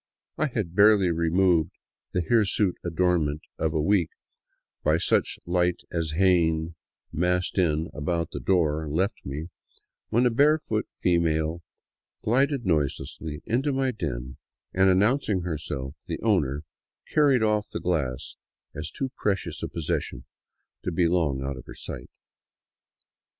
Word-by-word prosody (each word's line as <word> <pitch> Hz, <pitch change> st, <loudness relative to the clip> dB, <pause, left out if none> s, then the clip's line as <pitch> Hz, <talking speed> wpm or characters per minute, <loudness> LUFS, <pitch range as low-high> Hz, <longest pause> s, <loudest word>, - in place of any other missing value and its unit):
I 155 Hz, -, +1 dB
had 105 Hz, -, -3 dB
barely 100 Hz, -2 st, +5 dB
removed 85 Hz, 0 st, +2 dB, 0.3 s
the 90 Hz, -, 0 dB
hirsute 105 Hz, -1 st, +2 dB
adornment 85 Hz, -3 st, +1 dB, 0.2 s
of 80 Hz, 0 st, +1 dB
a 80 Hz, -, 0 dB
week 90 Hz, +1 st, +2 dB, 0.7 s
by 75 Hz, +1 st, +3 dB
such -, -, +1 dB
light 90 Hz, 0 st, +1 dB
as 80 Hz, -3 st, -2 dB
Jaen, 85 Hz, -2 st, +2 dB, 0.4 s
massed 90 Hz, +3 st, 0 dB
in 90 Hz, -, +5 dB
and 80 Hz, +2 st, -1 dB
about 85 Hz, +2 st, -2 dB
the -, -, -5 dB
door, 80 Hz, -4 st, +1 dB
left 95 Hz, +9 st, -1 dB
me, 75 Hz, +5 st, -5 dB, 0.6 s
when 120 Hz, +3 st, +3 dB
a 125 Hz, -, +4 dB
barefoot 145 Hz, -3 st, +2 dB
female 85 Hz, -1 st, 0 dB, 0.6 s
glided 135 Hz, +2 st, +2 dB
noiselessly 75 Hz, -1 st, -2 dB
into 130 Hz, +6 st, +1 dB
my 135 Hz, -1 st, +1 dB
den 65 Hz, -, -5 dB, 0.4 s
and, 95 Hz, +1 st, +4 dB
announcing 105 Hz, +1 st, +2 dB
herself 75 Hz, -5 st, -4 dB
the -, -, -3 dB
owner, 75 Hz, -10 st, +1 dB, 0.5 s
carried 140 Hz, -6 st, +4 dB
off 105 Hz, -1 st, +1 dB
the -, -, -4 dB
glass 75 Hz, -8 st, -2 dB, 0.4 s
as 75 Hz, +1 st, -5 dB
too 135 Hz, -, -4 dB
precious 100 Hz, -3 st, -2 dB
a -, -, -2 dB
possession 80 Hz, -3 st, -3 dB, 0.6 s
to 90 Hz, -, -3 dB
be 85 Hz, 0 st, +2 dB
long 80 Hz, -6 st, +1 dB
out 70 Hz, 0 st, -3 dB
of 65 Hz, -, -11 dB
her -, -, -9 dB
sight. -, -, -7 dB
90 Hz, 135 wpm, -26 LUFS, 80-105 Hz, 0.7 s, barely